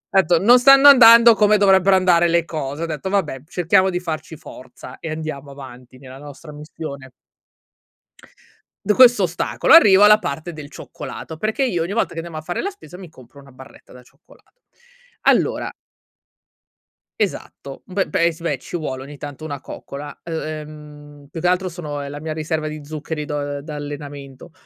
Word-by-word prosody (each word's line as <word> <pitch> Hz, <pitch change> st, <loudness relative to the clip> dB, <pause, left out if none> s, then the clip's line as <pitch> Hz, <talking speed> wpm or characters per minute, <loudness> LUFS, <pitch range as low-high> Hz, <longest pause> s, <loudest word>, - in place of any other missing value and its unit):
Ho -, -, +7 dB
etto: 170 Hz, -2 st, +2 dB
"Non 245 Hz, +4 st, +6 dB
stanno 275 Hz, +2 st, +7 dB
andando 235 Hz, -3 st, +8 dB
come 210 Hz, 0 st, +3 dB
dovrebbero 195 Hz, -1 st, +4 dB
andare 175 Hz, -2 st, +3 dB
le 170 Hz, 0 st, +1 dB
cose". 155 Hz, -1 st, -6 dB
Ho -, -, -1 dB
detto: 160 Hz, +3 st, -5 dB
"Vabbè 155 Hz, -9 st, -2 dB
cerchiamo 185 Hz, +2 st, +1 dB
di 180 Hz, -1 st, -3 dB
farci 160 Hz, -1 st, -6 dB
forza 130 Hz, -4 st, -13 dB
e 160 Hz, -, -7 dB
andiamo 155 Hz, -3 st, -7 dB
avanti 130 Hz, -2 st, -13 dB
nella 130 Hz, -1 st, -12 dB
nostra 145 Hz, +2 st, -12 dB
missione". 150 Hz, -2 st, -9 dB, 1.8 s
D 210 Hz, -, +2 dB
questo 245 Hz, -6 st, +6 dB
ostacolo, 175 Hz, -1 st, -2 dB
arrivo 205 Hz, -11 st, +7 dB
alla 210 Hz, +1 st, +7 dB
parte 160 Hz, +3 st, -5 dB
del 150 Hz, -2 st, -10 dB
cioccolato, 160 Hz, +1 st, -9 dB
perché 220 Hz, -, -2 dB
io 175 Hz, -10 st, -1 dB
ogni 190 Hz, +4 st, -5 dB
volta 230 Hz, -, 0 dB
che -, -, -13 dB
andiamo 165 Hz, -1 st, -7 dB
a 155 Hz, -, -5 dB
fare 175 Hz, +3 st, -4 dB
la 395 Hz, -, -3 dB
spesa 180 Hz, -, -14 dB
mi 185 Hz, -2 st, -11 dB
compro 135 Hz, -2 st, -18 dB
una 135 Hz, -1 st, -17 dB
barretta 130 Hz, +1 st, -16 dB
da 125 Hz, -, -15 dB
cioccolato. -, -, -26 dB, 0.6 s
Allora -, -, +1 dB, 1.5 s
Esatto. 160 Hz, -8 st, -5 dB
Beh 190 Hz, 0 st, -2 dB
beh 170 Hz, 0 st, +1 dB
sì 165 Hz, -, -15 dB
beh, 150 Hz, -5 st, -2 dB
ci 155 Hz, -, -9 dB
vuole 135 Hz, -5 st, -5 dB
ogni 145 Hz, +1 st, -12 dB
tanto 145 Hz, +2 st, -9 dB
una 145 Hz, -3 st, -6 dB
coccola. 140 Hz, +1 st, -10 dB
E 170 Hz, -, -9 dB
ehm, 150 Hz, -2 st, -9 dB
più 160 Hz, -, -8 dB
che 175 Hz, -, 0 dB
altro 180 Hz, +1 st, 0 dB
sono 150 Hz, -5 st, -7 dB
è 140 Hz, -, -7 dB
la 145 Hz, +1 st, -8 dB
mia 155 Hz, 0 st, -5 dB
riserva 155 Hz, 0 st, -3 dB
di 155 Hz, -1 st, -8 dB
zuccheri 150 Hz, 0 st, -6 dB
do 150 Hz, -1 st, -4 dB
uhm, 145 Hz, 0 st, -4 dB
da 150 Hz, +1 st, -9 dB
allenamento. 145 Hz, -1 st, -9 dB
155 Hz, 185 wpm, -20 LUFS, 145-185 Hz, 1.8 s, andando